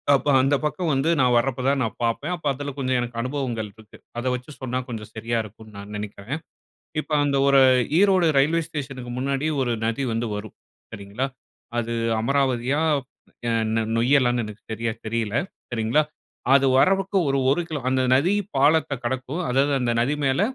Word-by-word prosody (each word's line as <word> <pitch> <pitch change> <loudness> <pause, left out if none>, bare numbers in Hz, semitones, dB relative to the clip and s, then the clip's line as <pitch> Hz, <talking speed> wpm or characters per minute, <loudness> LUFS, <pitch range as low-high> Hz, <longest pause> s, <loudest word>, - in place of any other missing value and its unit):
அப்போ 140 - 0
அந்த 135 +2 +3
பக்கம் 165 +1 -1
வந்து 135 +5 +1
நான் 125 -1 +4
வரப்ப 130 +1 0
தான் 140 -1 +1
நான் 110 - -3
பார்ப்பேன். 140 +9 -1
அப்ப 155 - -13
அதில 145 +1 -5
கொஞ்சம் 130 -1 +1
எனக்கு 120 -1 -4
அனுபவங்கள் 125 -5 -3
இருக்கு. 110 -1 -16 0.2
அதை 130 - -3
வச்சு 125 +4 -8
சொன்னா 125 0 -2
கொஞ்சம் 110 -3 -6
சரியா 115 +1 -1
இருக்குன்னு 110 0 -13
நான் 100 +1 -9
நினைக்கிறேன். 105 +7 -5 0.6
இப்போ 155 - -7
அந்த 140 -1 +1
ஒரு 140 -1 +6 0.4
ஈரோடு 190 -4 +4
ரயில்வே 165 +4 +3
ஸ்டேஷனுக்கு 135 -5 -6
முன்னாடி 140 +3 -1 0.2
ஒரு 120 -2 0
நதி 115 +4 -1
வந்து 115 0 -1
வரும். 105 +1 -7 0.4
சரிங்களா! 100 +6 -3 0.5
அது 115 0 -3 0.3
அமராவதியா, 135 +2 +1 0.7
அ - - +1 0.2
நொ 115 - +2 0.2
நொய்யலான்னு 120 -1 +3
எனக்கு 105 +1 -10
சரியா 115 +1 -2 0.2
தெரியல. 115 -1 -2 0.4
சரிங்களா! 115 +6 +2 0.5
அது 140 0 +5
வரதுக்கு 195 +5 +3
ஒரு 135 0 +1
1 175 +6 +2
கிலோ 155 -3 -3
அந்த 130 0 +2
நதி 145 +9 +3 0.2
பாலத்த 145 +2 +3
கடக்கும். 130 +6 -3
அதாவது 135 +3 +2
அந்த 120 -2 0
நதி 125 +5 +2
மேல, 135 +4 +2
130 Hz, 165 wpm, -24 LUFS, 115-140 Hz, 0.7 s, ஒரு